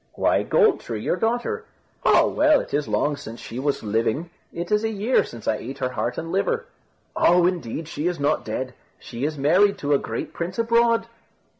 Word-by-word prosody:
"Why, - - +2
Gold 440 -5 +3
tree, 115 -2 -5
your - - +1
daughter." 240 - -1 0.4
"Oh! - - +5
well, 305 0 +4
it - - -7
is 145 -1 0
long 110 +8 +1
since 115 -2 -9
she 120 - -7
was 140 -1 -1
living. 115 +10 -1 0.2
It 170 +3 -5
is 210 +1 +3
a 225 - +1
year 220 +4 +2
since 115 -2 -10
I 110 - +2
ate 135 +6 -7
her 130 -2 -1
heart 125 -1 -3
and 165 0 -4
liver." 465 - 0 0.5
"Oh! 175 0 +4
indeed 165 -4 -2
she 160 +1 -3
is 175 -3 -2
not 145 +2 +1
dead. 125 +3 -4 0.2
She 120 +3 -5
is 155 0 -2
married 185 +8 +4
to 145 -5 0
a 140 - +4
great - - -5
prince 175 +2 -4
abroad." 230 0 +3
165 Hz, 200 wpm, -23 LUFS, 130-210 Hz, 0.5 s, Oh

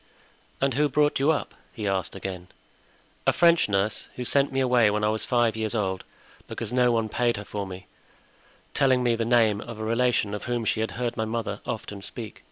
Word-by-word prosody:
"And 135 -1 +1
who 145 +3 +2
brought 150 +1 +2
you 140 +3 +3
up?" 160 - 0 0.2
he 105 -3 -4
asked 95 -1 -1
again. 95 -2 -6 0.8
"A - - +7
French 170 -7 +4
nurse, 100 +1 0
who 125 - -4
sent 140 +3 +3
me 135 - -1
away 125 -4 +4
when 105 +1 -1
I 105 - +3
was 110 0 -1
five 120 -3 +2
years 110 0 -1
old 95 -3 -1 0.4
because - - -5
no 125 -1 +4
one 115 -2 +1
paid 120 +1 0
her 100 - -7
for 100 -1 -4
me, 95 0 -9 0.9
telling 130 -2 +3
me 120 -1 +2
the 115 0 -1
name 110 -3 +3
of 115 -1 -8
a 110 - -5
relation 115 -2 +1
of 105 - -5
whom 120 -2 -2
she 110 - 0
had 110 - -1
heard 120 -1 -2
my 110 - 0
mother 110 -2 -3
often 105 -2 -5
speak." 110 +1 -5
115 Hz, 210 wpm, -26 LUFS, 105-125 Hz, 0.9 s, A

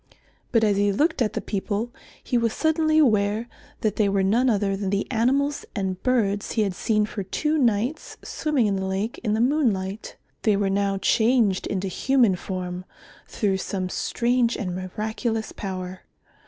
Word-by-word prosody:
But 230 -3 +3
as 205 -2 +3
he 205 0 +3
looked 305 - +1
at 215 - +1
the - - -2
people 210 +3 -2 0.3
he - - -2
was 230 -2 +2
suddenly 315 -1 +2
aware 215 -5 +3 0.3
that 215 - 0
they 210 -2 +3
were 195 -1 +1
none 235 +7 +3
other 200 -3 +1
than 195 -1 -3
the 200 +1 0
animals 275 +5 +1
and 190 -3 -2
birds 210 -5 0
he 220 - +2
had 195 -2 -1
seen 210 +3 +1
for 210 - -5
two 300 +11 -1
nights 240 +4 0
swimming 300 -7 0
in 200 -2 +1
the 190 - -2
lake 195 +4 -2
in 215 -2 +1
the - - 0
moonlight. 225 -7 0 0.3
They 210 -3 +3
were 195 -1 +1
now 200 0 +1
changed 220 -1 +2
into 195 0 -2
human 240 +1 +2
form, 180 -1 -5 0.4
through 200 -4 0
some 185 -1 -3
strange 240 +3 +1
and 185 -5 -3
miraculous 220 +4 -3
power. 185 -1 -6
210 Hz, 170 wpm, -24 LUFS, 195-240 Hz, 0.4 s, But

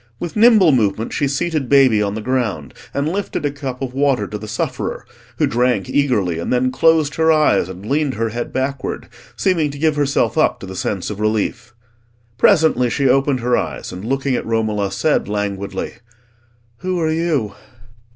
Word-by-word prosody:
With 175 - -5
nimble 215 -6 +6
movement 110 -3 0
she 145 - 0
seated 145 -1 -1
baby 130 -6 +5
on 100 0 -1
the 110 - -4
ground, 110 - -2 0.2
and 140 +1 -1
lifted 185 -3 -3
a 145 - 0
cup 135 -2 -6
of 125 -1 -4
water 135 -5 +1
to 105 +1 -6
the 110 - -8
sufferer, 110 - -3 0.3
who - - +2
drank 120 -4 +1
eagerly 105 - +1
and 85 - -3
then 125 +1 +2
closed 160 0 +3
her 160 0 +4
eyes 155 - +3
and 95 +2 -9
leaned 140 +2 0
her 115 +1 -1
head 120 +2 -4
backward, 135 +1 -3 0.3
seeming 170 -6 +1
to 145 - -8
give 155 +1 +1
herself 145 +2 +1
up - - +2
to - - -6
the 95 0 -8
sense 95 +1 -3
of 105 - -7
relief. 110 +2 -2 0.6
Presently 155 - +4
she 140 +3 +1
opened 135 0 +2
her 120 +1 +2
eyes, - - -3
and, 90 +2 -8
looking 135 +3 -1
at - - -2
Romola, 110 -3 -1
said 155 +9 0
languidly— 100 0 -4 0.8
"Who 185 +5 -2
are 160 -1 +1
you?" 155 -10 -1
130 Hz, 180 wpm, -19 LUFS, 110-150 Hz, 0.8 s, nimble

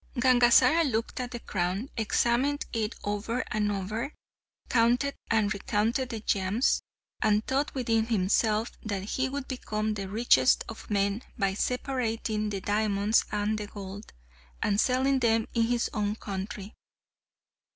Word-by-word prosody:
Gangazara 255 +5 +5
looked 230 -5 -1
at 250 -1 -3
the 240 - -6
crown, 190 +6 -2
examined 240 +5 +1
it 220 -2 -1
over 210 +4 -2
and 210 -1 +1
over, 210 +7 -3 0.5
counted 245 +4 +2 0.2
and 215 -2 +2
recounted 225 +5 0
the 230 -3 -4
gems, 205 +4 +1 0.4
and 215 0 +2
thought 280 +3 -1
within 225 -3 +1
himself 215 +1 +1
that 200 -3 -3
he 260 +6 -1
would 275 0 -5
become 215 -4 -2
the 195 -2 -5
richest 200 - +4
of 225 - -9
men 200 +1 +1 0.2
by 195 -3 +1
separating 225 -2 -1
the 200 -2 -4
diamonds 205 +1 +2
and 210 +1 0
gold, 200 0 -8 0.5
and 205 +1 +2
selling 265 +1 +2
them 225 -2 +2
in 230 -1 +2
his 240 0 +1
own 210 -1 -1
country. 200 0 -6
220 Hz, 135 wpm, -28 LUFS, 205-245 Hz, 0.5 s, Gangazara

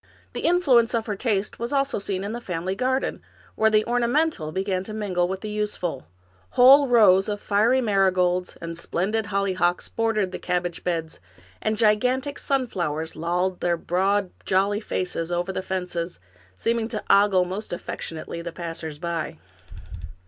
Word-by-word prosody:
The - - -4
influence 260 -10 +4
of 225 -1 -1
her 210 - -2
taste 210 -2 -1
was 235 +1 -3
seen 285 - +1
also 275 -8 -1
in 195 +2 -2
the 240 +1 -5
family 180 -2 -3
garden, 260 +5 -1 0.3
where 220 0 +3
the 215 0 +3
orna 240 +1 +1
mental 290 - 0
began 190 +1 -1
to 215 - -6
mingle 185 -5 0
with 190 +1 -4
the 215 - -5
useful; 210 - -3 0.5
whole 270 +3 +8
rows 210 -5 +5
of 205 0 -2
fiery 220 +7 +2
marigolds 185 -4 +1
and 165 0 -6
splendid 200 +6 -1
hollyhocks 190 -3 0
bordered 220 -4 0
the - - -5
cabbage 175 -1 -2
beds, 165 -2 -3 0.4
and 215 0 0
gigantic 250 +6 +2
sunflowers 170 - -2
lolled 180 +3 -1
their 175 -1 +1
broad, 190 +3 0
jolly 195 +2 +1
faces 175 -4 -3
over 175 +2 -1
the 185 - -2
fences, 180 -2 -4 0.4
seeming 230 - 0
to 225 -2 -4
ogle 200 -2 +5
most 190 +4 -5
affectionately 170 -1 -6
the 170 0 -5
passers 165 -3 -6
by. 165 -1 -4
195 Hz, 155 wpm, -24 LUFS, 175-225 Hz, 0.5 s, whole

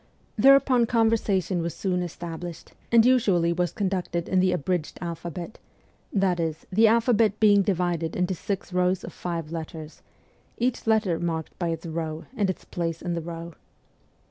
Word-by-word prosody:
Thereupon 255 0 +5
conversation 210 -6 +1
was 170 0 -3
soon 180 -2 -1
established, 170 -1 -7 0.2
and 230 -1 +6
usually 195 -10 +3
was 175 -1 0
conducted 180 -4 -2
in 185 - +2
the 185 0 +3
abridged 180 -1 -2
alphabet; 170 +2 -6 0.5
that 190 -3 +1
is, 160 -2 -3
the 220 +4 +5
alphabet 225 -2 +3
being 205 -2 +6
divided 175 -4 -1
into 180 +1 0
six 190 +1 -4
rows 180 0 +1
of - - -8
five 165 -3 -4
letters, 160 -1 -7 0.6
each 245 -1 -1
letter 215 -6 +2
is - - -7
marked 165 -2 -3
by 175 - 0
its 165 0 -3
row 160 -1 -4
and 205 -3 +1
its 185 - -4
place 165 -2 -3
in 175 0 -2
the 170 - -2
row. 170 0 -7
180 Hz, 160 wpm, -26 LUFS, 170-205 Hz, 0.6 s, and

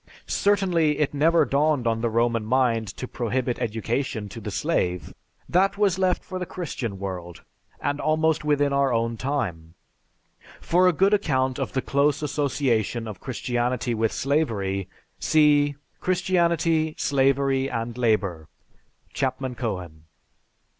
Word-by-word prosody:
Certainly, 180 -7 +2
it 150 -1 0
never 160 +4 +4
dawned 145 -2 +1
on 115 -1 0
the 115 - +1
Roman 115 0 +1
mind 115 -1 +1
to 125 - -5
prohibit 125 +1 -2
education 110 0 -2
to 115 - -9
the 105 - -5
slave. 90 - -1 0.3
That 195 +3 +2
was 195 -3 +2
left 185 -1 +1
for 185 0 -5
the 180 - -4
Christian 130 - -5
world, 90 -3 -6 0.4
and 145 +1 -2
almost 155 0 +1
within 145 -1 +2
our 140 -1 +2
own 115 0 0
time." 100 - -3 0.8
(For 180 +2 +3
a - - +6
good 195 +5 +2
account 130 -9 +1
of 135 - -3
the 130 - -1
close 145 +1 +1
association 130 -6 0
of 105 -4 -7
Christianity 120 -1 -2
with 115 -1 0
slavery 105 - -1 0.3
see, 145 -2 +3 0.3
"_Christianity, 170 -3 +1
Slavery, 135 0 +2
and 115 -1 -3
Labor," 105 -9 0 0.7
Chapman 130 -1 -2
Cohen. 90 -10 -5
130 Hz, 135 wpm, -24 LUFS, 115-155 Hz, 0.8 s, a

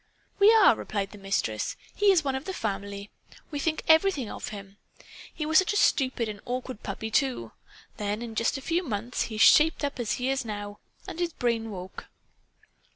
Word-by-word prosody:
"We 405 +2 +8
are," 440 - +6
replied 200 -2 -4
the 210 - -12
Mistress. 195 - -2 0.2
"He 410 0 +3
is 350 -5 +3
one 270 -2 -1
of 265 +2 -4
the 380 - -4
family. 200 -1 -4 0.4
We 290 - -3
think 315 +2 -1
everything 320 - +3
of - - -6
him. 200 -1 -9 0.5
He 305 - -4
was 315 0 +5
such 380 +3 0
a - - 0
stupid 255 - +2
and 210 -1 -6
awkward 250 -1 -5
puppy, 220 0 -5
too! 265 +1 0 0.5
Then, 210 +2 -3
in 230 -2 -7
just 230 +5 0
a - - -7
few 335 +5 0
months, 235 - -3
he 220 - -6
shaped 310 +8 +5
up, 280 -2 -4
as 235 -3 -1
he 255 +1 -2
is 270 0 -1
now. 205 -2 -6 0.3
And 325 - -7
his 345 -2 -1
brain 230 -2 -1
woke." 185 -2 -8
245 Hz, 195 wpm, -27 LUFS, 210-310 Hz, 0.5 s, We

